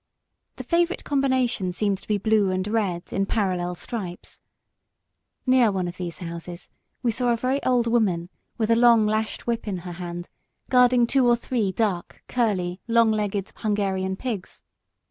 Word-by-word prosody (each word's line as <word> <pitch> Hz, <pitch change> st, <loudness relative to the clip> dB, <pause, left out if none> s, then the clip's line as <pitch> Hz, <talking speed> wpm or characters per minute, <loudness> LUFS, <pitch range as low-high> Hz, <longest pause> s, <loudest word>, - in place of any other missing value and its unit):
The -, -, -7 dB
favourite 345 Hz, +1 st, +1 dB
combination 260 Hz, -8 st, +1 dB
seemed 200 Hz, 0 st, 0 dB
to -, -, -18 dB
be 210 Hz, -, +1 dB
blue 210 Hz, -1 st, +2 dB
and 185 Hz, +1 st, -1 dB
red, 200 Hz, -5 st, -1 dB
in 195 Hz, 0 st, 0 dB
parallel 180 Hz, -5 st, -1 dB
stripes. 180 Hz, -2 st, -7 dB, 1.0 s
Near 255 Hz, -4 st, +4 dB
one 185 Hz, -2 st, -1 dB
of 175 Hz, -, -7 dB
these 175 Hz, -2 st, -5 dB
houses 170 Hz, 0 st, -8 dB, 0.3 s
we 240 Hz, -, +2 dB
saw 245 Hz, +3 st, 0 dB
a 235 Hz, -, +2 dB
very 260 Hz, +4 st, 0 dB
old 250 Hz, -2 st, +2 dB
woman 200 Hz, -8 st, +1 dB, 0.3 s
with 225 Hz, -1 st, +1 dB
a -, -, +6 dB
long 235 Hz, -2 st, +6 dB
lashed 215 Hz, +1 st, -1 dB
whip 230 Hz, -1 st, -2 dB
in 195 Hz, -3 st, -2 dB
her 180 Hz, -, -5 dB
hand, 175 Hz, 0 st, -6 dB, 0.4 s
guarding 250 Hz, -1 st, +5 dB
two 255 Hz, +1 st, +3 dB
or 240 Hz, -, +5 dB
three 235 Hz, -4 st, -1 dB
dark, 190 Hz, -4 st, -2 dB
curly, 190 Hz, -7 st, 0 dB
long 230 Hz, -1 st, +4 dB
legged 205 Hz, -2 st, -2 dB
Hungarian 195 Hz, -3 st, -1 dB
pigs. 220 Hz, -4 st, -5 dB
210 Hz, 165 wpm, -24 LUFS, 185-235 Hz, 1.0 s, a